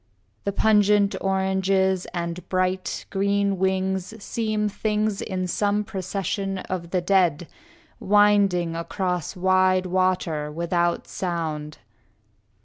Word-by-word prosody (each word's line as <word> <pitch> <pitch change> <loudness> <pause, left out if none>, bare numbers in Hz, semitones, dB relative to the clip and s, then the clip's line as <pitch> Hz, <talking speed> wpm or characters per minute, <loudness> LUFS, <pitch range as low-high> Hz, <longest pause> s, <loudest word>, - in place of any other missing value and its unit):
The 200 - +1
pungent 205 -1 +3
oranges 190 -1 +1
and 170 0 -5
bright, 185 0 -1
green 200 0 +1
wings 190 +1 -1
Seem 215 -2 -1
things 210 0 -1
in 185 -2 -3
some 205 +3 0
procession 195 -1 -3
of 185 -2 -5
the 180 0 0
dead, 175 -3 +2 0.5
Winding 200 -4 +3
across 180 0 -3
wide 185 0 +3
water, 180 -5 0
without 170 +2 -1
sound. 160 -4 -4
190 Hz, 100 wpm, -24 LUFS, 180-200 Hz, 0.5 s, pungent